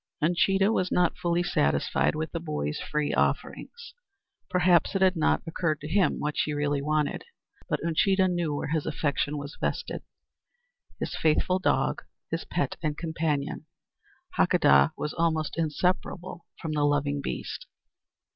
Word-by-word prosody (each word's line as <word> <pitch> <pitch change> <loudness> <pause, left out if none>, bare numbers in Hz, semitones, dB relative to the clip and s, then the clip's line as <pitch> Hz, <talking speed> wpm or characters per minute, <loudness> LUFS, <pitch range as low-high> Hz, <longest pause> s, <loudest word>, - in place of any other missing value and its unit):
Uncheedah 195 +5 +3
was 185 -5 0
not 180 -1 +2
fully 175 0 0
satisfied 70 - +1
with 155 +1 -3
the 165 - -3
boy's 150 - -3
free 150 -1 -1
offerings. 475 -1 -2 0.6
Perhaps 180 -1 +3
it 195 - +1
had 190 0 +4
not 160 - +2
occurred 165 -2 -1
to 150 - -7
him 190 +3 +2
what 150 0 -2
she 150 - 0
really 145 -1 0
wanted. 150 0 0 0.5
But - - 0
Uncheedah 190 +3 +3
knew 175 -4 -1
where 145 - -3
his 155 -1 -1
affection 145 -1 -1
was 145 0 -7
vested. - - -2 1.0
His - - -3
faithful 165 +4 +2
dog, - - +1 0.3
his - - -2
pet - - -2
and 150 -3 -2
companion 160 -3 -2 0.7
Hakadah 70 +1 +5
was 150 - -3
almost 160 -2 0
inseparable 170 +2 -2
from 160 - -4
the 150 -1 0
loving 145 -1 +1
beast. - - -5
160 Hz, 145 wpm, -27 LUFS, 150-175 Hz, 1.0 s, Hakadah